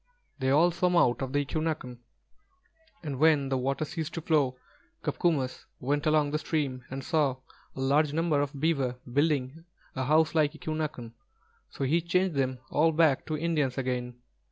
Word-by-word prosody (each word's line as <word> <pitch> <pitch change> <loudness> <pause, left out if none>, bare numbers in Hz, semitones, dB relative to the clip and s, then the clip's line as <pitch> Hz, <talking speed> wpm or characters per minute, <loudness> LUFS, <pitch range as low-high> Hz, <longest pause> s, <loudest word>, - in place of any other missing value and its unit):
They 130 -1 0
all 160 +6 +5
swam 180 +1 +1
out 120 -8 +3
of 130 -1 -3
the 145 0 +1
eqū'nāk'n, 155 -5 -3 1.0
and 140 -4 -4
when 150 -3 +4
the 135 - +1
water 135 +4 -1
ceased 160 0 -5
to 165 - -3
flow, 145 -6 +1 0.5
Copcomus 145 -8 -1
went 145 +4 -1
along 155 -2 +3
the 155 - 0
stream 140 -6 -2
and 135 +1 -5
saw 145 -4 +1 0.4
a - - -8
large 140 +3 +2
number 160 -2 +1
of 145 0 -4
beaver 140 -5 +1 0.2
building 145 +1 0 0.3
a 130 -1 -2
house 155 +2 +3
like 155 -2 +2
eqū'nāk'n, 155 -6 -4 0.6
so - - -5
he 155 +6 +2
changed 180 +1 +1
them 130 -1 0
all 160 +3 +3
back 155 -4 +2
to 155 -1 -2
Indians 150 -5 0
again. 125 -2 -2
145 Hz, 165 wpm, -28 LUFS, 135-160 Hz, 1.0 s, all